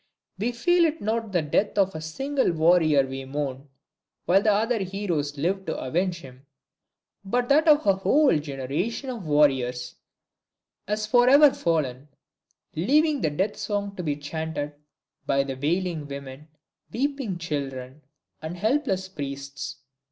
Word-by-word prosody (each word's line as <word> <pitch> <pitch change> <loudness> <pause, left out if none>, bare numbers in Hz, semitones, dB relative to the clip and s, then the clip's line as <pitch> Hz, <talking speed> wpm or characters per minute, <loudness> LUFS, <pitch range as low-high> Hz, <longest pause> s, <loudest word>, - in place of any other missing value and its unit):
We 230 +4 0
feel 345 +8 +3
it 315 -1 +1
is - - -19
not 220 0 -2
the 175 -4 +1
death 200 +8 0
of 195 -1 +3
a 160 - -6
single 270 - -1
warrior 160 -3 +4
we 135 0 -6
mourn, 135 0 -4 0.6
while 195 +4 +3
other 220 +3 +2
heroes 180 -7 -2
live 185 +7 -1
to - - -2
avenge 170 +5 -1
him, 135 0 -14 0.8
but 245 +5 -1
that 305 +3 +4
a 305 - +9
whole 265 - +3
generation 150 - -3
of 220 -9 -7
warriors 130 -4 +1 0.9
has 210 +1 -1
forever 255 +5 +6
fallen, 145 -5 -1 0.7
leaving 290 - +2
the 155 - +2
death 190 +8 -1
song 200 -1 -3
to 180 - -4
be 150 -4 -1
chanted 150 0 -4 0.5
but 140 0 +2
by 135 - -3
wailing 165 -1 -1
women, 140 +1 -8 0.4
weeping 270 -6 -2
children 140 -4 -5 0.4
and 160 +3 -6
helpless 215 - 0
priests. 140 -6 -7
175 Hz, 135 wpm, -25 LUFS, 145-220 Hz, 0.9 s, a